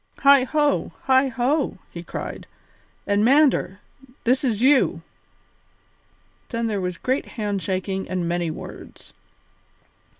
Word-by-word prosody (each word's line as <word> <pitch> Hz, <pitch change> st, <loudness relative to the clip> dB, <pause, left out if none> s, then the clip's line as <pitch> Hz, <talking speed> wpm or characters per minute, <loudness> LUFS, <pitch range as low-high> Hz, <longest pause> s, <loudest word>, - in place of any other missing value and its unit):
"Heigho, 280 Hz, +2 st, +3 dB
heigho!" 265 Hz, +1 st, +2 dB
he 170 Hz, -, -7 dB
cried, 175 Hz, -, -7 dB, 0.6 s
"and 205 Hz, +1 st, +1 dB
Mander, 265 Hz, -6 st, +3 dB, 0.4 s
this 255 Hz, +3 st, +2 dB
is 235 Hz, -3 st, 0 dB
you!" 270 Hz, +1 st, +3 dB, 1.5 s
Then 230 Hz, -1 st, -2 dB
there 210 Hz, -3 st, -1 dB
was 180 Hz, -1 st, -3 dB
great 260 Hz, +8 st, -1 dB
hand 205 Hz, -3 st, -2 dB
shaking 190 Hz, +1 st, -3 dB
and 180 Hz, -2 st, -2 dB
many 170 Hz, -1 st, -1 dB
words. 155 Hz, -, -10 dB
230 Hz, 105 wpm, -23 LUFS, 190-265 Hz, 1.5 s, Heigho